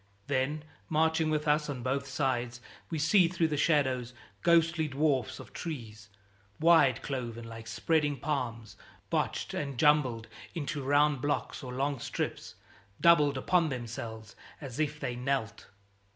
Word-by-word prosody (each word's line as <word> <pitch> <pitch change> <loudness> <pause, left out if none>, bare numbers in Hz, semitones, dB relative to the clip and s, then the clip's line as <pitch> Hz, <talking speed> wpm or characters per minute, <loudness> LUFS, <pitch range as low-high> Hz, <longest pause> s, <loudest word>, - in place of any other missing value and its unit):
Then, 145 +4 -1 0.3
marching 160 0 +2
with 150 0 -1
us 150 0 +2
on 130 -4 -4
both 140 +2 -1
sides, 125 -3 -1 0.3
we 165 - -2
see 170 +4 +4
through 170 -2 0
the 150 - -1
shadows 130 -5 +1 0.3
ghostly 165 -1 +3
dwarfs 140 -3 0
of - - -12
trees, 110 -10 -7 0.5
wide 160 -6 +5
cloven 120 -4 -4
like 115 0 -9
spreading 150 -3 +1
palms; 115 -7 -3 0.3
botched - - -1
and 140 -3 -3
jumbled 130 -6 +3 0.3
into 145 -2 -3
round 145 0 +3
blocks 145 +1 -2
or 125 - -6
long 135 +1 -1
strips; - - -4 0.4
doubled 150 -5 +5
upon 170 +4 +2
themselves, 115 -4 -6 0.2
as 135 -2 -7
if 150 -1 -1
they 125 - -3
knelt. 125 -3 -2
140 Hz, 135 wpm, -30 LUFS, 125-155 Hz, 0.5 s, wide